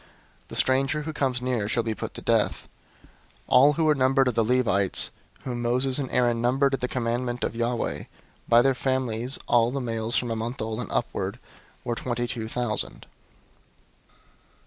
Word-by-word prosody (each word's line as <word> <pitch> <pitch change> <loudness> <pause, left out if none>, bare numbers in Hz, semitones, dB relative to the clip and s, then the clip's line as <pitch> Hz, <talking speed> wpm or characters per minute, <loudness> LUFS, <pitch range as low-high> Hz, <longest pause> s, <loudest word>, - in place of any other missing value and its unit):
The - - -9
stranger 135 +3 +2
who 160 +1 -5
comes 130 -4 -1
near 120 -5 -1
shall 115 +1 +1
be 110 -1 -1
put - - -6
to - - -8
death. - - +1 0.4
003:039 - - -22 0.4
All 140 +3 +6
who 160 - 0
were 155 - +5
numbered 135 -1 +3
of - - -2
the 115 - +2
Levites, 110 -5 +2 0.3
whom 120 -2 -4
Moses 125 +3 +1
and 135 -3 -3
Aaron 120 -2 +1
numbered 135 +3 +2
at 135 - 0
the 125 - -1
commandment 120 0 -2
of - - -2
Yahweh, 120 +1 -2 0.4
by 120 0 +7
their 135 - +3
families, 130 -1 -1
all 120 -1 +4
the 140 +2 -3
males 115 -2 -2
from 120 0 0
a - - -1
month 115 +4 -4
old 110 +1 -3
and 125 - -5
upward, 100 -2 -2 0.5
were 120 - -2
twenty 120 0 -2
two 115 -2 -4
thousand. 115 -2 -2
125 Hz, 180 wpm, -26 LUFS, 115-130 Hz, 0.5 s, by